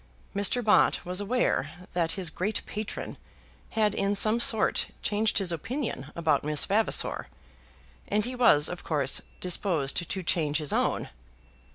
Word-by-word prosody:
Mr. 205 +5 +3
Bott 210 -2 +3
was 180 +2 -2
aware 195 - -1
that 170 -2 0
his 185 -5 -2
great 205 +6 -2
patron 210 0 -6 0.6
had 210 -2 +2
in 200 0 0
some 215 +3 +4
sort 220 -2 +3 0.2
changed 215 +1 +1
his 195 -4 +1
opinion 220 - -4
about 165 -2 +1
Miss 150 0 0
Vavasor, 215 +3 +1 0.8
and 210 0 0
he 250 - -4
was 160 -12 +4
of 180 - -5
course 140 -4 +1 0.2
disposed 175 -6 -1
to 190 -2 -3
change 155 -4 0
his 150 -2 -1
own. - - 0
190 Hz, 145 wpm, -27 LUFS, 160-215 Hz, 0.8 s, some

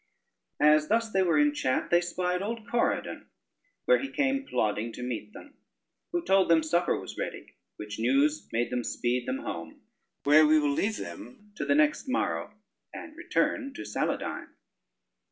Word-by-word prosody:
As 150 0 +5
thus 230 0 +1
they 190 - +2
were 170 -4 +2
in 150 0 +4
chat, 130 -3 -1
they 175 0 +5
spied 180 +1 -2
old 220 +1 -4
Corydon 240 - -1 0.6
where - - +5
he 275 - -4
came 275 -1 0
plodding 110 +2 -1
to 125 - -7
meet 115 -4 -5
them, 290 - -13 0.6
who 345 -1 -2
told 190 -2 +3
them 165 -1 +5
supper 175 +3 +1
was - - -9
ready, - - -6 0.2
which 105 +1 -7
news 140 +6 +2
made 120 +2 -1
them 125 -1 -1
speed 120 +1 -1
them 130 - -1
home. 85 -1 -7 0.4
Where 150 +2 +6
we 155 +1 +5
will 145 -2 +2
leave 210 +8 0
them 235 -8 -10
to - - -3
the 285 - +2
next 300 -1 +2
morrow, 265 - -1 0.4
and 310 - -9
return 305 -5 -1
to - - -7
Saladyne. - - -3
170 Hz, 170 wpm, -28 LUFS, -, 0.6 s, Where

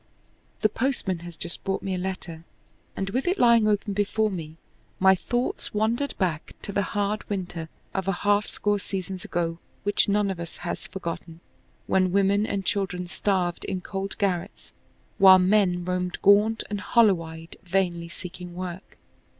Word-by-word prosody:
The 215 - +4
postman 220 -7 -1
has 170 -1 -10
just 175 0 -4
brought 195 0 -2
me 195 - -2
a - - -1
letter, 180 -3 -5 0.5
and 195 0 -3
with 255 - -1
it 365 +3 +2
lying 235 - +5
open 205 -1 +1
before 210 +2 +1
me, 160 -4 -6 0.4
my 190 0 +6
thoughts 240 +4 -2
wandered 230 +6 0
back 170 -5 -1
to - - -4
"the 200 - +1
hard 205 +2 -1
winter" 175 -5 -4 0.2
of 190 -1 -2
a - - +3
half 205 +1 +3
score 205 -1 0
seasons 190 -1 -5
ago 165 -1 -2 0.2
which 205 0 +2
none 200 -1 +2
of 185 - -6
us 170 -1 -7
has - - -4
forgotten, 170 -2 -6 0.5
when 185 -1 +2
women 200 +2 +3
and 195 -1 -2
children 180 -3 -1
starved 180 -1 0
in 185 -1 -3
cold 195 +1 -4
garrets 185 -4 -2 0.5
while 190 -1 +10
men 185 -2 +3
roamed 180 0 -1
gaunt 210 +3 +5
and 205 -1 -2
hollow 210 -8 +4
eyed 160 0 -9
vainly 175 -2 0
seeking 180 0 -8
work. 180 0 -7
190 Hz, 165 wpm, -26 LUFS, 175-205 Hz, 0.5 s, while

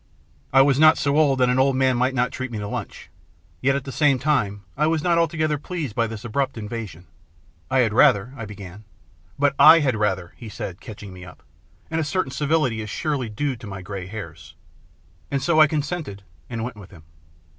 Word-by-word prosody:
I 135 0 +6
was 140 -1 +2
not 155 +1 +7
so 140 -1 0
old 145 -3 +3
that 125 - +4
an 125 +1 +2
old 135 0 +3
man 130 -1 +2
might 130 +2 0
not 125 0 +1
treat 130 0 -5
me 110 - -4
to 105 - -4
a - - -5
lunch. - - -7 0.5
Yet 135 +1 +2
at 140 - -2
the 135 - -7
same 140 -1 +3
time 105 -9 0
I 155 - +1
was 160 -1 0
not 170 -1 +3
altogether 155 -2 0
pleased 155 - -5
by 115 -1 +1
this 110 0 -8
abrupt 135 +3 -2
invitation. 105 -6 -7 0.3
" 85 +3 -34
I 130 0 +3
had 110 -3 +1
rather" 110 +3 +4
I 115 -4 -6
began. 100 -1 -10 0.3
" 85 +2 -33
But 140 0 +2
/had 145 -7 +7
rather," 95 -4 -1
he 115 - -9
said, 95 -3 -7
catching 105 -3 -10
me 90 -1 -11
up, 90 - -14 0.2
" 90 - -34
and 165 0 0
a - - 0
certain 155 -2 -2
civility 145 -6 0
is 105 - -7
surely 140 -2 -2
due 135 +6 -2
to 115 -2 -10
my 95 -2 -7
grey 95 -1 -6
hairs." 80 -7 -9 0.7
And 140 - 0
so 155 +4 +3
I 155 - +8
consented, 145 - -4 0.3
and 115 -2 -4
went 120 -2 -6
with 100 -4 -12
him. 80 -5 -15
125 Hz, 220 wpm, -23 LUFS, 105-145 Hz, 0.7 s, I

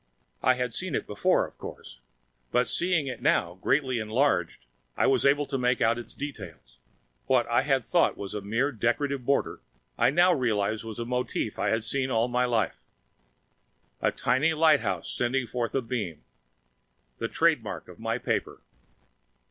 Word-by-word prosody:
I 130 +1 +4
had 125 -1 -2
seen 180 -1 -3
it - - -2
before, 105 -1 +2
of - - -13
course, - - -10 0.5
but 125 0 +2
seeing 175 -4 +1
it 130 -2 -5
now, 135 - +2
greatly 130 -4 +1
enlarged, 110 - 0 0.3
I - - +3
was 135 0 +3
able 145 +1 +3
to 135 -1 -3
make 125 0 +1
out 115 0 +2
its 120 - -9
detail. 145 -1 -6 0.7
What 130 -2 +3
I 120 +1 +2
had 135 -4 +1
thought - - +2
was 100 -1 -6
a 105 - -3
mere 115 +8 0
decorative 140 +3 -1
border, 140 - 0 0.4
I - - +5
now 175 +6 +4
realized 110 -6 0
was 110 -1 -7
a 120 - -3
motif 125 +1 -2
I - - +1
have 110 0 0
seen 135 +1 -1
all 115 -1 +2
my 125 +1 +1
life! 115 -3 0 1.2
A - - +2
tiny 155 +5 +1
lighthouse 155 -2 +2
sending 125 +1 -1
forth 120 +1 -3
a 135 - +1
beam! 105 -10 -4 1.0
The - - -1
trademark - - 0
of - - -13
my - - -1
paper! - - -2
125 Hz, 165 wpm, -27 LUFS, 115-140 Hz, 1.2 s, I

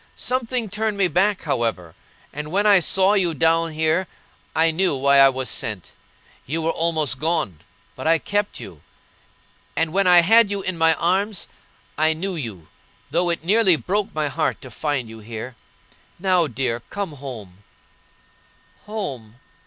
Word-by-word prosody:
Something 250 -2 -2
turned 210 +1 -2
me 195 -2 +3
back, 190 +4 +1
however; 110 -9 -2 0.4
and 150 +1 -6
when 200 +3 +1
I 205 -2 +6
saw 190 +3 +3
you 180 -5 +1
down 165 +1 +2
here 160 +4 0 0.5
I 160 +1 +4
knew 175 -1 +1
why 140 +1 +4
I 135 0 +8
was 130 -1 -3
sent. 105 -5 -4 0.6
You 160 +4 -2
were 165 - +1
almost 160 -6 0
gone, 155 - -1 0.4
but 130 - -5
I 165 0 +5
kept 205 +5 -2
you; - - -10 0.9
and 165 -1 0
when 195 0 +2
I 175 -1 +8
had 225 +4 +5
you 200 -1 -3
in 185 -1 -2
my 165 -1 +4
arms 190 +3 0 0.5
I 155 +1 +4
knew 185 +5 -3
you, 110 - -7 0.4
though 175 0 +1
it 170 -2 -2
nearly 195 0 +4
broke 205 +6 -2
my 155 -1 0
heart 155 +2 -1
to 130 - -11
find 140 0 -2
you 110 0 -11
here. 115 +3 -8 0.6
Now, 180 -2 +2
dear, 125 -2 -2
come 200 -4 -4
home. 115 -10 -10 1.2
"Home! 135 - -6
165 Hz, 160 wpm, -22 LUFS, 135-190 Hz, 1.2 s, I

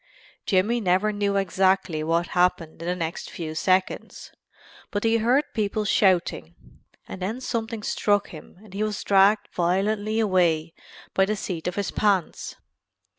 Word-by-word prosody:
Jimmy 210 +5 +2
never 190 +2 +2
knew 205 -1 0
exactly 190 -4 +1
what 165 +2 0
happened 180 -3 0
in 170 - -5
the 180 - 0
next 165 -2 -4
few 160 -2 -6
seconds, 185 +3 -1 0.6
but 205 - -3
he 225 0 +3
heard 250 +6 +2
people 215 0 -1
shouting, 175 - +1 0.5
and 190 - -8
then 215 +7 -3
something 225 -3 -4
struck 205 -1 +1
him 155 +1 -12
and 210 -3 -15
he 200 - -4
was 215 -2 -2
dragged 200 +2 +4
violently 205 +5 0
away 175 -6 +1 0.4
by 190 - +3
the 215 +2 -1
seat 180 -5 -5
of 180 - -2
the 200 -2 -2
pants. 200 -5 0
195 Hz, 150 wpm, -24 LUFS, 175-215 Hz, 0.6 s, dragged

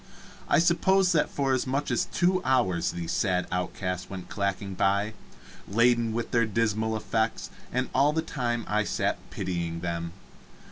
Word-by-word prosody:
I - - +5
suppose 180 +3 +4
that 155 -4 +2
for 135 -2 0
as 130 0 0
much 140 +3 -1
as - - +1
two 185 +1 +1
hours 120 -10 +2
these 85 -1 -4
sad 90 -2 +1
outcasts 90 0 -3
went 95 -2 -7
clacking 100 -1 -2
by, 100 +3 +1 0.5
laden 115 +2 +3
with 115 +1 -3
their 115 -2 +3
dismal 110 0 0
effects, 110 +1 -1 0.2
and 125 +1 0
all 140 +3 +4
that 160 +1 -1
time 120 -6 -2
I 105 +1 +1
sat - - -1
pitying 85 -2 -3
them. 85 -1 -3
110 Hz, 155 wpm, -27 LUFS, 95-130 Hz, 0.5 s, I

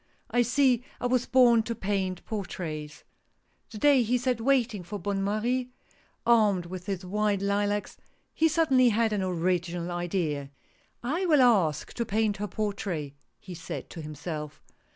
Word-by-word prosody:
" - - -39
I 245 - +3
see 250 0 +3 0.2
I - - -4
was 245 0 +1
born 245 -3 +5
to 230 +1 -4
paint 190 -3 -2
portraits." 160 -7 -5 0.7
The 215 - -9
day 280 +2 +5
he 240 +2 +1
sat 250 -1 -1
waiting 240 -5 +1
for 180 +4 -6
Bonne 195 +1 -2
Marie, 240 +5 -1 0.6
armed 210 -6 +4
with 180 +2 -8
his 190 -2 -3
white 205 +1 0
lilacs, 205 +1 -1 0.4
he 320 - +3
suddenly 275 -6 +4
had 220 0 +1
an 205 - 0
original 175 -1 -1
idea: 170 -5 -2 0.3
" - - -38 0.2
I 375 - 0
will 300 -5 +5
ask 195 -11 +2
to 235 - -2
paint 215 -1 0
her 210 +1 -3
portrait! 195 -8 -3 0.2
" - - -48
he 185 - -9
said 170 - -7
to 165 - -7
himself. 150 0 -6
205 Hz, 165 wpm, -28 LUFS, 180-240 Hz, 0.7 s, born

